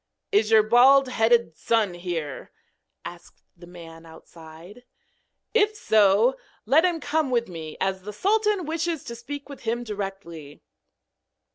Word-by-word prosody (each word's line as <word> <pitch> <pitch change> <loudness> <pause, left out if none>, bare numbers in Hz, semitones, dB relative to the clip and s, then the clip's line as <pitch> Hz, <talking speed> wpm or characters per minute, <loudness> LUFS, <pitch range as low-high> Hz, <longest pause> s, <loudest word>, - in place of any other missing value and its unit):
'Is 210 +1 +2
your 220 -1 +5
bald 255 +4 +5
headed 230 -7 +1
son 220 -2 0
here?' 170 -5 -6 0.5
asked - - -12
the 175 0 -15
man 165 -2 -13
outside. 165 +5 -15 0.7
'If 430 -1 +2
so, 220 - +3 0.3
let 285 +9 +4
him 345 -2 0
come 300 -1 -1
with 235 -2 0
me, 160 -4 -9
as 190 0 -2
the 210 +3 -8
sultan 415 - 0
wishes 325 0 -3
to 235 -4 -8
speak 280 +5 -8
with 280 -2 -11
him 235 +1 -3
directly.' 195 -8 -8
225 Hz, 135 wpm, -24 LUFS, 175-275 Hz, 0.7 s, your